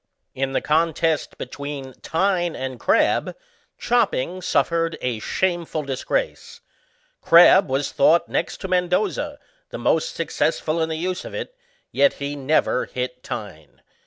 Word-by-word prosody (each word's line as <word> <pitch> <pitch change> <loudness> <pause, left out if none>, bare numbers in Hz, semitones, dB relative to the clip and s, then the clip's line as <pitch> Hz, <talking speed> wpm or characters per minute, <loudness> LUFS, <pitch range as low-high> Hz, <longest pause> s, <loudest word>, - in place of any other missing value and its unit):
In 135 0 -2
the - - +1
contest 160 0 0
between 140 -2 -6
Tyne 175 -1 0
and 130 -1 -5
Crabb, - - +2 0.4
chopping 195 - 0
suffered 165 -2 0
a 120 -3 -2
shameful 170 - -1
disgrace; 135 -2 -3 0.6
Crabb 170 0 +7
was 135 +1 -1
thought 165 +4 +4
next - - -2
to 190 - -4
Mendoza, 185 +11 0 0.3
the - - -6
most - - 0
successful 165 +1 -1
in 160 - 0
the 160 - -2
use 180 +2 -3
of - - -8
it, - - -5 0.4
yet 280 - +3
he 140 +1 -5
never 140 -2 +1
hit 125 0 -5
Tynk. 100 - -8
160 Hz, 130 wpm, -22 LUFS, 135-180 Hz, 0.6 s, Crabb